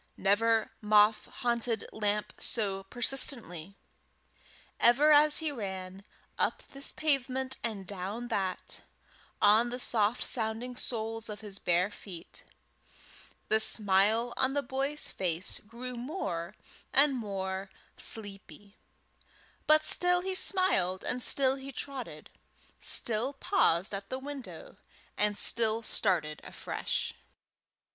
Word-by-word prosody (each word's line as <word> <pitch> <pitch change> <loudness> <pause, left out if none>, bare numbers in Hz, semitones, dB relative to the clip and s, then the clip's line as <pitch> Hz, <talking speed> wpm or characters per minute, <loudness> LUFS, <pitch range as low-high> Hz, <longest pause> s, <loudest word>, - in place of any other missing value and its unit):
Never 220 +3 +2
moth 210 0 +4
haunted 235 -2 -1
lamp 210 -1 -1
so 195 -4 -1
persistently. 220 - -2 1.0
Ever 275 +6 +5
as 300 +1 +6
he 315 -2 -1
ran, 190 -5 -6 0.4
up - - 0
this 275 0 -7
pavement 265 -3 0
and 210 -4 -3
down 200 +5 -5
that, 190 -2 -3 0.6
on 220 +4 +5
the 245 - -4
soft 225 -2 +1
sounding 230 +2 -3
soles 225 -2 -3
of 210 0 -7
his 205 -2 -5
bare 180 +3 +1
feet, 180 -5 -10 1.0
the 220 - +3
smile 220 +2 +4
on 260 +1 +2
the 285 - +1
boy's 275 +4 -2
face 180 0 -2
grew 245 +3 -6
more 225 - -4 0.4
and 280 +1 +4
more 195 -4 -4 0.3
sleepy, 205 -1 -6 0.9
but 310 0 +6
still 355 0 +3
he 380 +1 -2
smiled 370 - +3
and 250 - -2
still 265 +1 +3
he 270 +1 -8
trotted, 275 -1 -6 0.5
still 235 +4 0
paused 270 - +1
at 195 0 -5
the 260 - -3
window, 285 - -9 0.4
and 210 0 +1
still 225 0 +2
started 165 -9 0
afresh. - - -3
225 Hz, 115 wpm, -30 LUFS, 200-265 Hz, 1.0 s, as